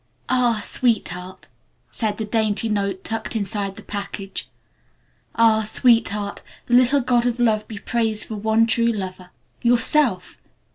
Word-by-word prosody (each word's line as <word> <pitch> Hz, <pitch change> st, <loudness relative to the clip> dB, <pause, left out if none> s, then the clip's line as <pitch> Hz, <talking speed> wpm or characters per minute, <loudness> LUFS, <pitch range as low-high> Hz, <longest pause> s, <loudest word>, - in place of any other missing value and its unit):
"Ah, 245 Hz, -4 st, +2 dB
Sweetheart 185 Hz, -7 st, -2 dB, 0.2 s
" -, -, -43 dB
said 215 Hz, -3 st, -2 dB
the 220 Hz, -, -3 dB
dainty 215 Hz, 0 st, 0 dB
note 200 Hz, -3 st, -2 dB
tucked 225 Hz, +1 st, -4 dB
inside 200 Hz, -2 st, -2 dB
the -, -, -11 dB
package 200 Hz, -1 st, -5 dB, 0.9 s
"Ah, 225 Hz, -1 st, +4 dB
Sweetheart, 215 Hz, -2 st, +1 dB, 0.2 s
the 240 Hz, -, -3 dB
little 255 Hz, +3 st, +5 dB
god 245 Hz, -1 st, +2 dB
of 240 Hz, -1 st, -1 dB
love 220 Hz, -3 st, +2 dB
be 215 Hz, -, -8 dB
praised 220 Hz, -1 st, -1 dB
for 220 Hz, -, -5 dB
one 220 Hz, +2 st, +2 dB
true 230 Hz, +1 st, +2 dB
lover 185 Hz, -4 st, -6 dB, 0.3 s
Yourself! 245 Hz, -2 st, +2 dB
220 Hz, 140 wpm, -22 LUFS, 200-235 Hz, 0.9 s, little